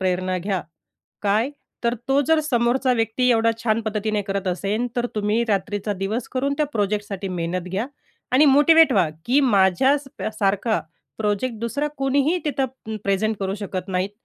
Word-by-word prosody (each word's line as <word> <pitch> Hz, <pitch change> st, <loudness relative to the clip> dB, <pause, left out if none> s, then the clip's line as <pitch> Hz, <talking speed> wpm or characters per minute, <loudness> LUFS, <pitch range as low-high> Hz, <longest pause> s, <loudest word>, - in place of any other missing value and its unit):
प्रेरणा 185 Hz, 0 st, 0 dB
घ्या. 190 Hz, 0 st, -2 dB, 0.6 s
काय? 215 Hz, +6 st, +2 dB, 0.3 s
तर 235 Hz, 0 st, +2 dB
तो 270 Hz, +1 st, +4 dB
जर 320 Hz, 0 st, +4 dB
समोरचा 255 Hz, -2 st, +1 dB
व्यक्ती 230 Hz, +2 st, +1 dB
एवढा 230 Hz, -1 st, +3 dB
छान 225 Hz, 0 st, +2 dB
पद्धतीने 215 Hz, -1 st, -1 dB
करत 195 Hz, 0 st, -3 dB
असेन, 200 Hz, +6 st, -1 dB
तर 240 Hz, 0 st, +1 dB
तुम्ही 210 Hz, +2 st, +1 dB
रात्रीचा 205 Hz, +1 st, -1 dB
दिवस 200 Hz, +5 st, -3 dB
करून 270 Hz, +2 st, 0 dB
त्या 300 Hz, -, +2 dB
प्रोजेक्टसाठी 205 Hz, -2 st, -2 dB
मेहनत 180 Hz, 0 st, -3 dB
घ्या 200 Hz, +7 st, -2 dB, 0.5 s
आणि 265 Hz, +4 st, +6 dB
मोटिवेट 295 Hz, +2 st, +6 dB
व्हा, 185 Hz, -6 st, +3 dB, 0.2 s
की 265 Hz, +4 st, +4 dB
माझ्या 210 Hz, +2 st, +4 dB
स 280 Hz, -, -13 dB
प -, -, -2 dB
सारखा 205 Hz, +3 st, +1 dB, 0.4 s
प्रोजेक्ट 215 Hz, +3 st, -1 dB
दुसरा 280 Hz, +6 st, -1 dB
कोणीही 280 Hz, +5 st, +2 dB
तिथं 275 Hz, -3 st, 0 dB, 0.2 s
प् 220 Hz, -, -4 dB
प्रेझेंट 200 Hz, +2 st, +1 dB
करू 195 Hz, 0 st, -1 dB
शकत 195 Hz, -2 st, -5 dB
नाहीत, 185 Hz, +1 st, -1 dB
215 Hz, 165 wpm, -22 LUFS, 195-255 Hz, 0.6 s, आणि